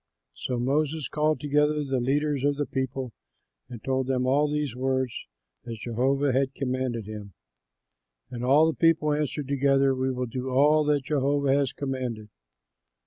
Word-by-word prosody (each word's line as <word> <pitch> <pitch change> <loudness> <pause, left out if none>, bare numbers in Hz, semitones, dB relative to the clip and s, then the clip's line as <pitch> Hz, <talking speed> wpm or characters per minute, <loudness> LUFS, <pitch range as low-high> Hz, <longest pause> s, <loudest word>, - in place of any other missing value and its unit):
'" - - -58
So 125 - -1
Moses 145 +3 0
called 150 +1 0
together 150 +1 +1
the 135 -2 -1
leaders 140 +2 0
of 145 0 +2
the 145 +1 -1
people 130 -2 -3 0.6
and 120 -3 -9
told 130 -1 -1
them 130 -1 0
all 145 +3 +2
these 150 -5 -2
words, 130 -1 -1 0.5
as 115 -1 -5
Jehovah 130 +5 0
had 135 +1 0
commanded 130 -4 -2
him. 105 -2 -8 1.0
And 120 -1 -5
all 140 +5 +5
the 160 - 0
people 165 -2 +3
answered 150 -1 -2
together, 135 -1 +2
"We 130 0 -1
will 125 0 -2
do 125 +2 -5
all 150 +4 +4
that 145 -2 +1
Jehovah 140 0 +1
has 140 -2 +1
commanded." 125 -6 -4
135 Hz, 160 wpm, -26 LUFS, 125-145 Hz, 1.0 s, all